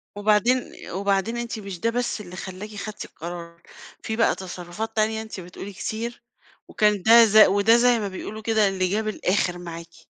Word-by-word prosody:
وبعدين 215 +5 +2 0.2
وبعدين 200 +4 0
أنتِ 235 -2 -4
مش 195 -4 -7
ده 230 - +1
بس 240 -2 -2
اللي 180 -2 -10
خلاكِ 195 +3 -8
خدتِ 210 +1 -6
القرار، 170 0 -9 0.4
في 220 - -3
بقى 230 - +3
تصرفات 190 +4 -6
تانية 220 0 +1
أنتِ 220 -3 -8
بتقولي 185 +3 -9
كتير، 235 +5 -5 0.4
وكان 210 -3 +2
ده 230 +2 +8
ز 215 0 +3
وده 215 +2 +6
زي 240 -1 +4
ما 205 - -2
بيقولوا 215 +3 -7
كده 220 -2 +2
اللي 185 -1 0
جاب 215 +2 -1
الآخر 185 -3 0
معاكِ. 170 -1 -9
210 Hz, 170 wpm, -24 LUFS, 185-220 Hz, 0.4 s, ده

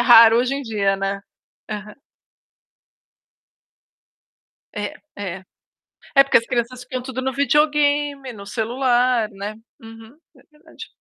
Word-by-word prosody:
raro 230 -1 +8
hoje 255 +2 +1
em 280 - -4
dia, 200 -4 0
né. 195 0 -2 0.5
Aham 210 0 -6 2.8
É, - - -3 0.2
é. 190 -2 -6 0.7
É 275 - +8
porque 275 - +4
as 230 - -2
crianças 245 +1 -2
ficam 255 0 -5
tudo 260 0 -5
no 265 0 -2
videogame, 290 -1 +1
no 200 -2 -10
celular, 245 +1 +1
né. 200 +2 -6 0.3
Uhum, 225 +4 -13 0.2
é - - -20
verdade. 310 +2 -13
245 Hz, 120 wpm, -21 LUFS, 215-275 Hz, 2.8 s, raro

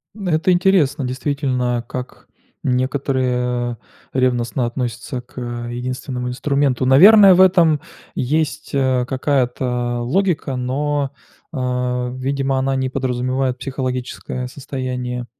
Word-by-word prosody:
Это 185 -4 +1
интересно 175 -6 +3
действительно, 125 -2 -1
как 125 0 -7 0.4
некоторые 125 -2 0 0.3
ревностно 125 -1 0
относятся 120 +1 -4
к, 125 - -26
э, 120 -1 -5
единственному 125 0 -4
инструменту. 135 0 0
Наверное, 195 +9 +8
в - - +1
этом 175 -5 +5 0.4
есть, 150 +3 -1
э, 130 -2 +2
какая-то 125 -2 0
логика, 155 +1 0
но, 140 +2 -1 0.4
э, 125 -2 -1
видимо, 135 +1 -1
она 135 +1 0
не 130 0 -1
подразумевает 130 0 -1
психологическое 130 -1 -4
состояние, 125 -2 -4
130 Hz, 100 wpm, -20 LUFS, 125-140 Hz, 0.4 s, Наверное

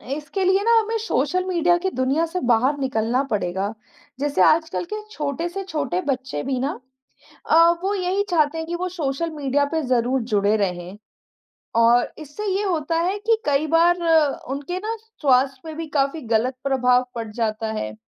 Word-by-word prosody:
इसके 300 +6 -4
लिए 380 +2 +3
ना 465 - +3
हमें 450 +1 -1
सोशल 330 +7 +1
मीडिया 345 -1 +2
की 380 +2 -1
दुनिया 270 +6 +1
से 350 +3 -4
बाहर 255 +6 +2
निकलना 250 -1 0
पड़ेगा। 195 +1 -1 0.5
जैसे 290 0 0
आजकल 320 +2 +2
के 425 - -4
छोटे 300 0 -3
से 390 +2 -5
छोटे 290 - -2
बच्चे 260 - -3
भी 260 -2 -2
ना 270 0 -2 0.7
अ, - - +2 0.3
वो 400 +1 0
यही 380 +2 0
चाहते 320 -3 +2
हैं 320 - -4
कि 345 - -3
वो 365 +1 -3
सोशल 330 -2 -2
मीडिया 285 -1 0
पे 320 -1 0
ज़रूर 250 +1 +1
जुड़े 205 +1 +3
रहें, 180 -1 -3 0.8
और 235 +1 +4
इससे 310 +8 -7
ये 405 - 0
होता 330 -4 -1
है 370 +4 0
कि 445 +1 +1
कई 290 +1 +1
बार 335 +3 +4 0.5
उनके 285 +6 -4
ना, 440 +3 -3 0.3
स्वास्थ्य 265 -1 +2
पे 320 -1 -7
भी 325 0 -5
काफ़ी 280 +3 0
गलत 250 +4 +1
प्रभाव 250 -2 +2
पड़ 230 -1 -4
जाता 220 0 -2
है। 110 0 -4
290 Hz, 175 wpm, -22 LUFS, 250-345 Hz, 0.8 s, और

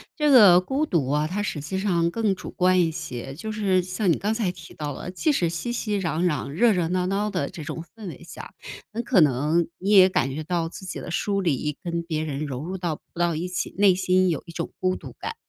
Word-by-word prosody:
这 300 -2 +2
个 200 -8 +8
孤 270 +11 -1
独 150 -7 +1
啊， 150 +1 +1
它 205 +4 -2
实 155 - -3
际 190 +6 -4
上 175 -4 +1
更 215 +1 0
主 190 - -8
观 185 0 +2
一 165 - +2
些。 135 -5 -6
就 220 +6 -5
是 195 -4 +1
像 185 +1 0
你 - - +2
刚 210 +2 -1
才 215 -6 0
提 170 -2 -13
到 150 -1 -4
了， 175 +6 -6
即 245 - +1
使 175 - +1
熙 170 +8 -3
熙 215 -4 -1
攘 165 +1 0
攘 150 -6 0
热 225 +11 +3
热 175 -3 0
闹 180 +1 0
闹 200 +3 0
的 180 -8 -2
这 160 - -8
种 165 +3 -5
氛 220 -3 -9
围 175 - -9
下， - - -10 0.4
很 235 +3 -3
可 235 -7 +4
能 150 +4 +2
你 195 +3 -2
也 190 -2 +8
感 135 -7 0
觉 155 - -4
到 165 +1 -1
自 185 - -10
己 175 - -5
的 175 - -7
疏 200 +3 0
离 150 -4 -1
跟 170 -1 -2
别 160 -2 -3
人 150 -1 -3
融 135 0 -5
入 185 +2 -4
到 170 -3 -1
不 170 - -15
到 175 -1 +2
一 170 +3 -3
起， 180 -1 -4
内 200 -1 +6
心 185 0 +2
有 160 -5 -1
一 - - -8
种 170 0 -4
孤 185 0 +1
独 - - -10
感。 - - -5
180 Hz, 270 characters per minute, -24 LUFS, 160-195 Hz, 0.4 s, 个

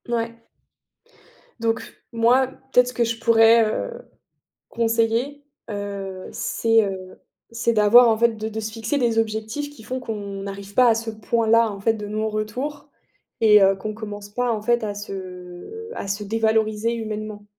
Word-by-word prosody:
Mouais. 230 -1 -3 1.2
Donc 225 0 -3
moi, 240 +3 +4 0.2
peut-être 250 -1 +5
ce 250 - -5
que 240 - +1
je 230 0 -2
pourrais, 225 0 +6
heu, 480 - -4 0.7
conseiller, 230 +5 0 0.3
heu, 200 -2 -5
c'est, 225 -1 +2
heu, 190 -2 -6 0.3
c'est 230 0 0
d'avoir, 225 +3 +7
en 220 - +2
fait, 230 0 +2
de 215 0 -3
de 220 0 -5
se 220 0 -4
fixer 225 +5 -2
des 235 -4 +2
objectifs 220 +6 -2
qui 290 -6 -15
font 255 +4 -4
qu'on 200 -5 -5
n'arrive 200 0 -8
pas 250 +1 +5
à 225 - +4
ce 225 0 -3
point-là, 230 +1 +2
en 200 - -8
fait, 225 +3 +2
de 210 -2 -6
non-retour 215 +7 -3 0.5
et 210 -2 +7
heu, 195 0 +5
qu'on 215 +3 -5
commence 205 -2 -8
pas, 245 +3 -1
en 215 -2 -2
fait, 240 +2 +1
à 205 -1 -3
se 190 - -8
à - - -5
se 200 +2 -2
dévaloriser 220 +1 +1
humainement. 215 -2 -5
220 Hz, 165 wpm, -23 LUFS, 210-230 Hz, 1.2 s, d'avoir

